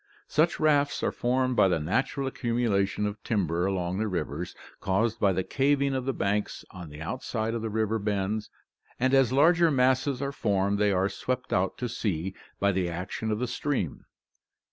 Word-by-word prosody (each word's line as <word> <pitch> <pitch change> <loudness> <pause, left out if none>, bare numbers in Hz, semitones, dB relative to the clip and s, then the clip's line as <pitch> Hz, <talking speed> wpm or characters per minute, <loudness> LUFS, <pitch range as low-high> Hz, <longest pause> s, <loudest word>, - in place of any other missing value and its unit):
Such 160 +3 +2
rafts 145 -2 +2
are - - +1
formed 130 +1 0
by 100 - +5
the 90 - +2
natural 135 - -1
accumulations 115 -6 0
of 105 0 -4
timber 90 -4 0
along 95 -1 -1
the 110 - 0
rivers, 85 -3 -3 0.2
caused 110 +4 0
by 100 - +4
the 95 0 0
caving 140 +4 +1
of 130 -1 -2
the 135 - +1
banks 105 -1 -1
on 90 -4 -9
the 75 +1 -10
outside 110 +5 -3
of 115 - -2
the 110 - -3
river 110 +1 0
bends, 105 +1 -1 0.5
and 130 +2 +2
as 135 -3 +5
larger 165 +5 +5
masses 130 -1 +2
are 140 0 -2
formed 100 -5 0
they 105 -1 +3
are 95 0 +2
swept 125 +5 -3
out 95 0 +1
to 125 - -2
sea 95 -5 -2 0.3
by 100 0 +3
the 90 -2 0
action 90 +6 -4
of 105 - 0
the 125 - -1
stream. 125 - -2
110 Hz, 185 wpm, -28 LUFS, 95-130 Hz, 0.5 s, by